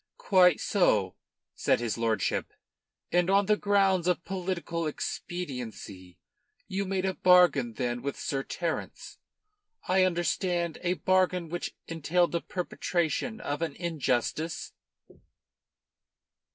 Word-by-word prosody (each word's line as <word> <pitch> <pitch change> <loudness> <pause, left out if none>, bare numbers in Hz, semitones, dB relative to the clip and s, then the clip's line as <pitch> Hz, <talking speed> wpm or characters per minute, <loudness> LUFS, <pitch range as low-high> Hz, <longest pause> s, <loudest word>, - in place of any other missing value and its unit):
"Quite 180 -4 +4
so," 105 - +2 0.4
said - - +1
his 120 -3 -2
lordship. 115 -4 -1 0.6
"And 175 +1 +2
on 200 +1 +4
the 210 +2 +4
grounds 195 -4 +2
of 180 -1 0
political 175 -3 -3
expediency 120 - -6 0.5
you 195 +1 -2
made 190 0 -1
a 190 - 0
bargain 180 -11 +4
then 120 +1 -2
with 140 0 -4
Sir 135 -1 -2
Terence, 165 +4 -5 0.7
I 185 0 +4
understand, 175 -1 0
a 180 0 +1
bargain 185 -3 +1
which 175 +1 -4
entailed 165 +2 +1
the 170 - -1
perpetration 180 +4 -2
of 145 +2 -3
an 160 -4 -2
injustice." 160 -1 -2
175 Hz, 110 wpm, -28 LUFS, 140-185 Hz, 0.7 s, Quite